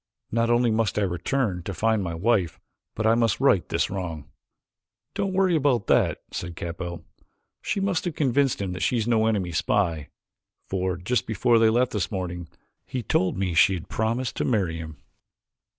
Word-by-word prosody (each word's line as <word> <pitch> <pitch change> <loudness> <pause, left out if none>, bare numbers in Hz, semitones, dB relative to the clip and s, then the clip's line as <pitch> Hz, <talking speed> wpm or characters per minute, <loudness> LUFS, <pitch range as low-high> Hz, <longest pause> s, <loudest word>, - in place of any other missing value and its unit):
"Not 115 +1 +1
only 120 0 +3
must 110 -3 0
I 105 - +2
return 95 +2 -1
to 95 +2 -6
find 110 +3 +1
my 85 -2 -3
wife 95 -2 +1 0.4
but 110 - -2
I 110 - +5
must 115 -1 +1
right 125 -10 +3
this - - 0
wrong." 85 -6 -5 0.9
"Don't 195 - -1
worry 185 -2 +2
about 135 -8 +2
that," - - +2
said 85 -1 -5
Capell, 85 +1 -6 0.6
"she - - -2
must 195 -3 0
have 175 -3 -3
convinced 140 -1 +1
him 100 -2 -3
that 90 - -6
she 125 - +1
is 115 0 -1
no 110 -2 +3
enemy 100 -6 0
spy, 85 -2 0 0.6
for 95 -1 -1
just 115 +8 -1
before 115 +2 +3
they 115 -1 +5
left 120 +3 +2
this 105 -4 -1
morning 90 -3 -4 0.4
he 125 -2 -4
told 95 -2 +1
me 95 -2 -1
she 80 +5 +5
had 85 - -8
promised 115 +3 -1
to - - 0
marry 95 -9 0
him." 80 -1 -8
105 Hz, 180 wpm, -25 LUFS, 90-120 Hz, 0.9 s, I